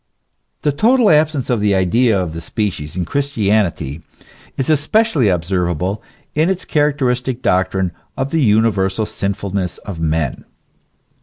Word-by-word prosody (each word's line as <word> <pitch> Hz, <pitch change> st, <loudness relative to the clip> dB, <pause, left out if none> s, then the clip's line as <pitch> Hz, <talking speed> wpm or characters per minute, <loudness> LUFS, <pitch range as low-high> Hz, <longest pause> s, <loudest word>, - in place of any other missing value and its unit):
The 150 Hz, -, +2 dB
total 225 Hz, -, +4 dB
absence 150 Hz, -4 st, +2 dB
of 120 Hz, -, +1 dB
the 100 Hz, -1 st, +2 dB
idea 100 Hz, +4 st, +2 dB
of 90 Hz, -4 st, -3 dB
the 85 Hz, -, -6 dB
species 85 Hz, -4 st, -3 dB
in 90 Hz, -2 st, -2 dB
Christianity 100 Hz, -, 0 dB, 0.6 s
is 135 Hz, -, -1 dB
especially 155 Hz, -, +2 dB
observable 90 Hz, +2 st, -1 dB, 0.3 s
in 155 Hz, +4 st, +2 dB
its 190 Hz, -1 st, -2 dB
characteristic 130 Hz, -4 st, 0 dB
doctrine 95 Hz, 0 st, +1 dB, 0.3 s
of 130 Hz, +1 st, -2 dB
the 165 Hz, -, +1 dB
universal 105 Hz, -3 st, +2 dB
sinfulness 100 Hz, -3 st, -3 dB
of 95 Hz, -6 st, -8 dB
men. 80 Hz, -3 st, -1 dB
105 Hz, 130 wpm, -18 LUFS, 90-140 Hz, 0.6 s, total